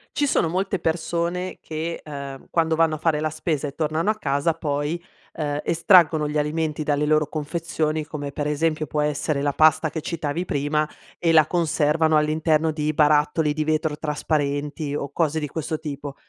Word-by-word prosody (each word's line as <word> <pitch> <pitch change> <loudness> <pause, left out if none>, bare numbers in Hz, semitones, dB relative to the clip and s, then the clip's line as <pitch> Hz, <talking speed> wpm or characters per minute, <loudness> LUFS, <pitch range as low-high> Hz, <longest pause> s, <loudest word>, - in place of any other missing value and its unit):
Ci 290 - +2
sono 220 - +2
molte 190 +2 -1
persone 170 +2 -2
che, 160 +2 -4
ehm, 140 -2 -8
quando 160 -1 +1
vanno 160 -1 +2
a - - -6
fare 155 -1 +1
la 155 0 0
spesa 155 -1 -2
e 140 - -8
tornano 160 +5 0
a 220 - +2
casa 140 -1 0
poi, 150 +2 -2 0.3
ehm, 145 -2 -2
estraggono 165 -3 +4
gli 150 +1 -2
alimenti 155 +1 -1
dalle 145 0 +1
loro 155 0 +3
confezioni, 155 0 -2
come 150 -2 -6
per 145 +1 -3
esempio 155 0 0
può 150 - -1
essere 150 -1 -1
la 145 - +2
pasta 155 +1 +4
che 160 - -4
citavi 165 0 -3
prima, 150 +1 0 0.3
e 165 - +2
la 155 -2 +6
conservano 160 -2 +2
all'interno 155 +1 +2
di 150 0 -1
barattoli 150 0 +3
di 155 +1 -1
vetro 155 0 0
trasparenti, 150 -1 -2
o 140 -1 -4
cose 160 0 0
di 150 - -3
questo 155 +1 -3
tipo. 145 -2 -6
155 Hz, 175 wpm, -23 LUFS, 150-160 Hz, 0.3 s, la